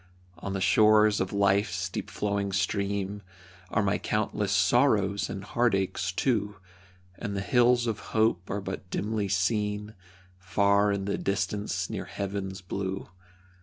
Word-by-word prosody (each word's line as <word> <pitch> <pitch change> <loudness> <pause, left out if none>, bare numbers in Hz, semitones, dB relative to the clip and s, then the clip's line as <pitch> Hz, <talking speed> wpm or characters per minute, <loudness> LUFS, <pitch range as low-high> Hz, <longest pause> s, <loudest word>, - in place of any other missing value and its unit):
On 100 +3 -4
the 95 - -2
shores 105 +1 +5
of 95 - -2
life's 100 -2 +1
deep 95 - -5
flowing 100 -1 -1
stream 100 0 -1 0.5
Are 105 - +1
my 100 0 +1
countless 105 -1 -1
sorrows 100 -2 +3
and 95 - -5
heartaches, 100 -5 0
too, 105 0 0 0.6
And 100 -3 -3
the - - -1
hills 120 +2 +3
of 110 -3 -2 0.2
hope 110 -5 +2
are 100 - -2
but 95 -1 -6
dimly 105 +1 -1
seen, 105 +2 0 0.5
Far 100 +2 +2
in 100 -1 -2
the 100 - -2
distance, 100 +2 -1
near - - -5
heaven's 95 -1 -4
blue. 95 +1 -4
100 Hz, 135 wpm, -28 LUFS, 95-105 Hz, 0.6 s, shores